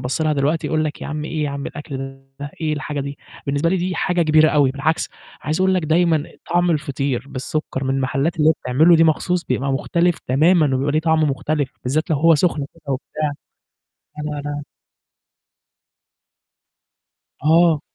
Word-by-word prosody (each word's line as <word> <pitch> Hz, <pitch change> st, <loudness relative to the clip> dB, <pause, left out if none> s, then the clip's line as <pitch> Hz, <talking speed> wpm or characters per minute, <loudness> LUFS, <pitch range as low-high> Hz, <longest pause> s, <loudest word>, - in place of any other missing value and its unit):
بَصّ 130 Hz, +5 st, -2 dB
لها 155 Hz, -1 st, +2 dB
دلوقتي 150 Hz, +3 st, 0 dB
يقُول 155 Hz, -1 st, 0 dB
لك 150 Hz, -, -4 dB
يا -, -, -4 dB
عم 150 Hz, 0 st, -4 dB
إيه 155 Hz, -1 st, -2 dB
يا 145 Hz, -, -2 dB
عم 140 Hz, 0 st, -5 dB
الأكل 150 Hz, -2 st, -7 dB, 0.4 s
ده؟ 145 Hz, -, -5 dB
إيه 155 Hz, -1 st, 0 dB
الحاجة 150 Hz, 0 st, -3 dB
دي؟ 140 Hz, +1 st, -6 dB, 0.3 s
بالنسبة 140 Hz, +4 st, +1 dB
لي 190 Hz, -, +2 dB
دي 180 Hz, 0 st, -2 dB
حاجة 175 Hz, +1 st, +1 dB
كبيرة 155 Hz, 0 st, +5 dB
أوي، 145 Hz, -3 st, +3 dB
بالعكس 145 Hz, +4 st, -1 dB, 0.3 s
عايز 155 Hz, +4 st, -1 dB
أقُول 190 Hz, 0 st, +3 dB
لك 180 Hz, -, +1 dB
دايمًا 160 Hz, -1 st, +2 dB, 0.3 s
طعم 175 Hz, 0 st, +3 dB
الفطير 140 Hz, -4 st, -1 dB
بالسُكّر 135 Hz, 0 st, -4 dB
من 135 Hz, 0 st, 0 dB
المحلّات 135 Hz, +4 st, 0 dB
اللي 155 Hz, 0 st, +3 dB
هي -, -, +6 dB
بتعملُه 160 Hz, +7 st, +5 dB
دي 165 Hz, -, +5 dB
مخصوص 175 Hz, +2 st, +1 dB
بيبقى 130 Hz, +2 st, -1 dB
مختلف 170 Hz, +5 st, +1 dB
تمامًا، 150 Hz, +1 st, +3 dB
وبيبقى 140 Hz, +2 st, 0 dB
ليه 155 Hz, -, +2 dB
طعم 160 Hz, -1 st, +2 dB
مختلف، 145 Hz, 0 st, -1 dB
بالذات 155 Hz, +6 st, -1 dB
لو 155 Hz, -, +3 dB
هو 165 Hz, +3 st, +5 dB
سخن 150 Hz, -3 st, +1 dB
كده 145 Hz, -4 st, -6 dB
وبتاع، 150 Hz, +3 st, -3 dB, 0.9 s
أنا 150 Hz, -1 st, -4 dB
أنا 145 Hz, 0 st, -5 dB, 2.8 s
آه. 160 Hz, -1 st, +4 dB
150 Hz, 175 wpm, -20 LUFS, 140-160 Hz, 2.8 s, هي